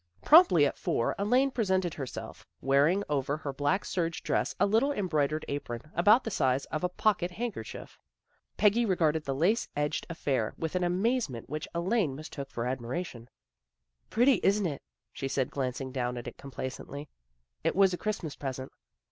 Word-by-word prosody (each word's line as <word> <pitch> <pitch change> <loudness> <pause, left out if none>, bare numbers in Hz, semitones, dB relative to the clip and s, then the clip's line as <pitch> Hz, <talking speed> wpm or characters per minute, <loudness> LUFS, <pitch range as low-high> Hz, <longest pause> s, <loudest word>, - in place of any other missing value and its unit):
Promptly 300 - +7
at 140 - -2
four 115 - 0
Elaine 250 +7 +3
presented 190 -8 0
herself, 135 -4 -7 0.2
wearing 145 +9 +3
over 145 0 0
her 145 -3 -5
black 145 +8 0
serge 170 -2 -2
dress - - 0
a - - +5
little 225 +8 +3
em 205 -9 -1
broidered 155 -1 0
apron, 140 0 -5
about 210 +8 +5
the 225 - -4
size 130 -5 +1
of 155 - -2
a 180 - +2
pocket 190 -2 +1
handkerchief. 205 - -6 0.6
Peggy 210 +3 +4
regarded 160 -7 +1
the 135 - -1
lace 185 - +2
edged 145 +1 -1
affair 135 -9 -1
with 160 +2 -3
an 180 - +1
amazement 180 - 0
which 155 0 -3
Elaine 175 - +1
mistook 140 -2 -7
for 120 -3 -4
admiration. 125 0 -4 0.4
" - - -50
Pretty, 245 -1 +4
isn't 200 +1 +3
it? 150 -5 -3 0.2
" - - -59
she 135 - -3
said, 130 -1 -1
glancing 130 0 -3
down 125 -2 -2
at 120 - -6
it - - -7
complacently. 140 +2 -7 0.3
" - - -49
It 165 - +1
was 195 -1 +5
a - - -1
Christmas 205 -8 -3
present." 130 -1 -5
155 Hz, 175 wpm, -29 LUFS, 135-195 Hz, 0.6 s, Promptly